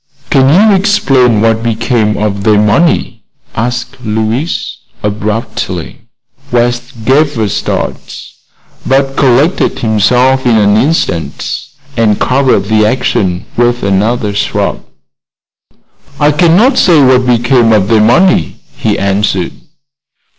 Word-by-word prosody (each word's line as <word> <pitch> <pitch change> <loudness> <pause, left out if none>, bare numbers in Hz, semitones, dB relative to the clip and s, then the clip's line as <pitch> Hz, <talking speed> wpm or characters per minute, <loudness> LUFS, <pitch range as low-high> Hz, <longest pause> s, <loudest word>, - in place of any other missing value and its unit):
"Can 135 -2 +3
you 200 +5 +4
explain 135 - +2
what 115 0 +1
became 115 -1 -1
of 100 -1 -2
their 105 -1 +3
money?" 105 +12 +1 0.3
asked 125 +3 -4
Louise, 110 +8 -3 0.3
abruptly. 105 -4 -4 0.5
West 120 0 -2
gave 145 +1 +1
a 110 -2 0
start, - - -4 0.7
but 135 0 0
collected 140 +7 +1
himself 125 +4 +1
in 120 -3 +2
an 105 -1 +3
instant 120 - -2 0.3
and 110 -3 +1
covered 130 -6 +1
the 110 +1 +1
action 105 -6 -1
with 120 0 0
another 105 +2 0
shrug. 100 - -2 1.4
"I 150 0 +3
cannot 180 - +3
say 165 -6 +4
what 130 -1 +3
become 120 -1 +2
of 105 -3 +2
their 110 -1 +3
money," 120 - +2 0.2
he - - -1
answered. 100 -2 -1
120 Hz, 110 wpm, -10 LUFS, 105-135 Hz, 1.4 s, you